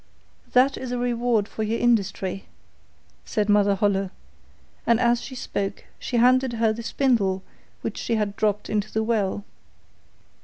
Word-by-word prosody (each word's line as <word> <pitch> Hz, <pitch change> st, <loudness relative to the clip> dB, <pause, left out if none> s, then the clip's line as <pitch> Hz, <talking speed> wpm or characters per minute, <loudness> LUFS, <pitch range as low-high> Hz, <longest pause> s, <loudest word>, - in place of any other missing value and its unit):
'That 260 Hz, +2 st, +4 dB
is 255 Hz, -1 st, -5 dB
a 250 Hz, -, -1 dB
reward 240 Hz, -3 st, +1 dB
for 220 Hz, -, -6 dB
your 220 Hz, +2 st, 0 dB
industry,' 195 Hz, -5 st, 0 dB, 0.8 s
said 210 Hz, -1 st, -1 dB
Mother 205 Hz, -1 st, +4 dB
Holle, 195 Hz, -1 st, +1 dB, 0.8 s
and 235 Hz, -1 st, +4 dB
as 240 Hz, -1 st, +3 dB
she 260 Hz, -, -8 dB
spoke 200 Hz, -5 st, -4 dB
she 245 Hz, -, -2 dB
handed 255 Hz, +1 st, +4 dB
her 225 Hz, -1 st, +2 dB
the 230 Hz, -, -6 dB
spindle 225 Hz, -7 st, +1 dB, 0.4 s
which -, -, -3 dB
she 230 Hz, -, -1 dB
had 210 Hz, -2 st, -1 dB
dropped 210 Hz, -1 st, 0 dB
into 210 Hz, 0 st, -1 dB
the 220 Hz, -, 0 dB
well. 210 Hz, -3 st, 0 dB
220 Hz, 150 wpm, -24 LUFS, 205-240 Hz, 0.8 s, That